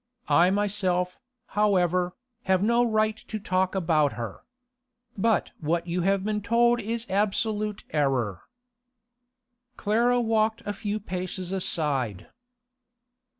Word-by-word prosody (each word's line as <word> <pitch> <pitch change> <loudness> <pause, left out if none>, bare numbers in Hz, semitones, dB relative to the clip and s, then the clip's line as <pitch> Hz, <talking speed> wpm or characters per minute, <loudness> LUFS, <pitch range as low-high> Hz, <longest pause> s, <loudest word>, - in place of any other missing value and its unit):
I 175 +2 +5
myself, 190 -3 0 0.3
however, 180 -3 +2 0.3
have 190 0 +2
no 235 +3 +3
right 215 -2 +1
to 220 - -6
talk 190 -2 0
about 160 -6 +2
her. 115 -5 -6 0.7
But 220 +2 +1
what 165 +2 -1
you 175 +1 -1
have 195 +1 +1
been 210 0 -1
told 235 +3 +3
is 230 +2 -3
absolute 210 +1 -1
error.' 130 - 0 1.4
Clara 235 +4 +2
walked 225 0 +1
a 205 - -2
few 210 +1 -3
paces 185 -2 -4
aside. 140 - -1
195 Hz, 110 wpm, -26 LUFS, 175-215 Hz, 1.4 s, I